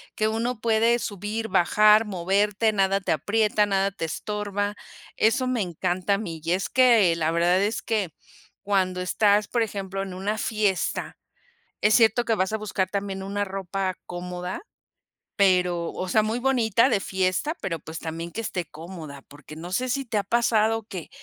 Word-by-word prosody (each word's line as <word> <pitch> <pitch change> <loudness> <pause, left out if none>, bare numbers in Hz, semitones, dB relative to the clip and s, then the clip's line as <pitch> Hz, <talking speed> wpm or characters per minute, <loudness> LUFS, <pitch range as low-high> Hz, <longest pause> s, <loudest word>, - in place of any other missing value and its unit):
que 215 - +1
uno 225 +2 -2
puede 230 +1 +3
subir, 215 +1 -4
bajar, 210 +4 +5
moverte, 205 +3 +1
nada 195 0 +2
te 195 - -2
aprieta, 210 +6 +2
nada 195 0 +1
te 195 -4 -4
estorba, 205 +3 -3 0.4
eso 255 +4 +2
me 255 -3 0
encanta 185 +2 -1
a - - -2
mí, 170 -7 -6
y 170 +2 +1
es 190 +1 -1
que 230 -10 +5
la 160 -1 0
verdad, 175 +3 +2
es 210 +3 -1
que, 210 -6 -1 0.5
cuando 185 -3 0
estás, 205 +2 +2
por 240 - 0
ejemplo, 195 -3 -3
en 190 -2 -6
una 205 +3 -2
fiesta, 210 -5 -1 0.7
es 210 - +4
cierto 230 0 +4
que 225 -1 +1
vas 190 +2 -1
a - - +2
buscar 195 -3 -2
también 195 -1 -3
una 200 +1 -2
ropa 190 -1 -3
cómoda, 180 - -5 0.7
pero 180 -3 +2
o 185 - -4
sea, 215 +4 +3
muy 220 +2 -1
bonita, 245 -2 +2
de 200 - +2
fiesta, 190 - -1
pero 170 -4 -2
pues 160 +1 -8
también 165 +1 -5
que 225 +7 -5
esté 180 -5 -3
cómoda, 155 -3 -10
porque 150 +2 -13
no 175 +3 -8
sé 255 +6 0
si 270 +2 -1
te 225 -3 -1
ha - - 0
pasado 225 0 +2
que 190 -5 -8
200 Hz, 175 wpm, -25 LUFS, 180-220 Hz, 0.7 s, bajar